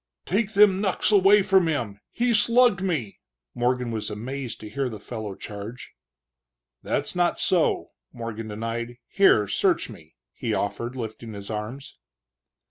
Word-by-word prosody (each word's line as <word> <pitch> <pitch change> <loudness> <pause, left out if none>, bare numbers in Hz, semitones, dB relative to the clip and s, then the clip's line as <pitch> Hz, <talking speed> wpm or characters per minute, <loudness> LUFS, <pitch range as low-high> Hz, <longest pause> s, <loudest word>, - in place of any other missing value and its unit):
"Take 215 +3 0
them 200 -2 +5
knucks 195 +1 +1
away 200 0 +6
from 190 -3 +4
him! 115 -10 -2
he 240 0 +1
slugged 230 -1 +4
me!" 155 - -2 0.3
Morgan 125 0 0
was 110 -2 -3
amazed 125 +3 -5
to 105 - -8
hear 135 +4 -2
the 110 -3 -8
fellow 110 -2 -6
charge. 105 +5 -8 0.9
"That's - - -2
not 175 -1 +2
so!" 175 -3 +1 0.2
Morgan 115 -2 -6
denied. 115 +3 -4
"Here 150 - +4
search 100 - +1
me," 80 +1 -15 0.2
he - - -2
offered, 120 +4 -3
lifting 115 -2 -6
his 100 +1 -7
arms. 110 +6 -6
120 Hz, 140 wpm, -25 LUFS, -, 0.9 s, away